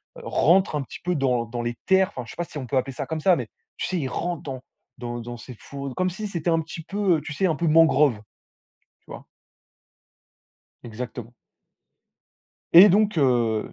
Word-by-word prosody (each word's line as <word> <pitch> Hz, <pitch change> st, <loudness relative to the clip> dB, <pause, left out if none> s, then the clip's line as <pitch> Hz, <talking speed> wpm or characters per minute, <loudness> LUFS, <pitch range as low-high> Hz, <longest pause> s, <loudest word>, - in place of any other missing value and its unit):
rentre 190 Hz, -, +2 dB
un 145 Hz, -, -1 dB
petit -, -, -10 dB
peu 180 Hz, 0 st, 0 dB
dans 125 Hz, -4 st, 0 dB
dans 120 Hz, +1 st, -5 dB
les 120 Hz, 0 st, -3 dB
terres. 190 Hz, 0 st, +3 dB
Enfin 125 Hz, -, -4 dB
je -, -, -11 dB
sais -, -, -12 dB
pas 175 Hz, -, -1 dB
si 150 Hz, -, -10 dB
on 130 Hz, -, -5 dB
peut 135 Hz, -, -3 dB
appeler 130 Hz, +1 st, -1 dB
ça -, -, -5 dB
comme 160 Hz, -1 st, -4 dB
ça, 180 Hz, +2 st, +4 dB
mais, 125 Hz, -4 st, -4 dB, 0.3 s
tu -, -, -2 dB
sais? 185 Hz, -, -2 dB
Il 135 Hz, -, -2 dB
rentre 175 Hz, -1 st, -3 dB
dans 130 Hz, -3 st, -6 dB, 0.4 s
dans 120 Hz, 0 st, -5 dB
dans 120 Hz, +1 st, -7 dB
ces 125 Hz, +2 st, -11 dB
fourn 140 Hz, -2 st, -7 dB
comme 185 Hz, 0 st, 0 dB
si 210 Hz, +4 st, -5 dB
c'était 170 Hz, -3 st, -3 dB
un 165 Hz, 0 st, +2 dB
petit 165 Hz, +1 st, -9 dB
peu, 195 Hz, -2 st, +1 dB
heu, -, -, -6 dB
tu 150 Hz, -, -7 dB
sais? 190 Hz, -, 0 dB
Un 160 Hz, -, 0 dB
peu 170 Hz, +1 st, -1 dB
mangrove. 150 Hz, -7 st, +4 dB, 0.8 s
Tu -, -, -43 dB
vois? -, -, -9 dB, 1.6 s
Exactement. 120 Hz, 0 st, -8 dB, 1.4 s
Et 185 Hz, +5 st, +10 dB
donc 210 Hz, -1 st, +2 dB
heu, 120 Hz, -6 st, +1 dB
150 Hz, 205 wpm, -24 LUFS, 125-175 Hz, 1.6 s, Et